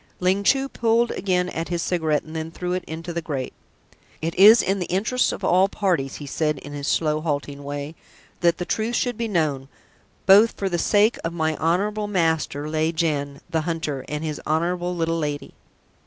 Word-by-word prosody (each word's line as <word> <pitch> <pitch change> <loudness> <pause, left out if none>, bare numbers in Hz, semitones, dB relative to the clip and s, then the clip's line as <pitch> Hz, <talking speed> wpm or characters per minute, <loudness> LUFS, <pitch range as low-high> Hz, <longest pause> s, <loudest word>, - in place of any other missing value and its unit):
Ling 190 +2 +1
Chu 270 +5 +3
pulled 235 -2 +1
again 180 -2 0
at 165 -1 -4
his 170 -2 -1
cigarette 160 -4 0
and 160 +1 -11
then 160 0 -3
threw 180 +2 -4
it 185 - -2
into 165 +2 -6
the 170 - -2
grate. 140 -5 -4 0.7
"It 165 +1 -2
is 215 +5 +8
in 195 +1 0
the 180 - -3
interests 220 +7 +1
of - - -7
all 185 +2 +4
parties," 175 -11 -1
he 145 - -7
said 150 +1 -1
in 145 +1 -9
his 145 -1 -5
slow, 155 -1 +1
halting 145 -2 -3
way, 145 +2 -5 0.5
"that 170 -1 +3
the 175 - -3
truth 220 +5 -1
should 245 -1 0
be 230 +1 -2
known, 155 -9 0 0.6
both 205 +4 +7
for 195 - -1
the 175 -2 -1
sake 210 +6 +3
of 165 - -2
my 160 -2 0
honourable 205 +6 0
master, 160 -6 0
Lieh 155 +1 0
Jen, 145 -3 -2
the 165 -2 -1
Hunter, 155 -4 -3
and 150 +1 -3
his 155 -2 -4
honourable 175 +3 0
Little 165 -1 0
Lady." 145 -2 -4
165 Hz, 195 wpm, -23 LUFS, 155-190 Hz, 0.7 s, is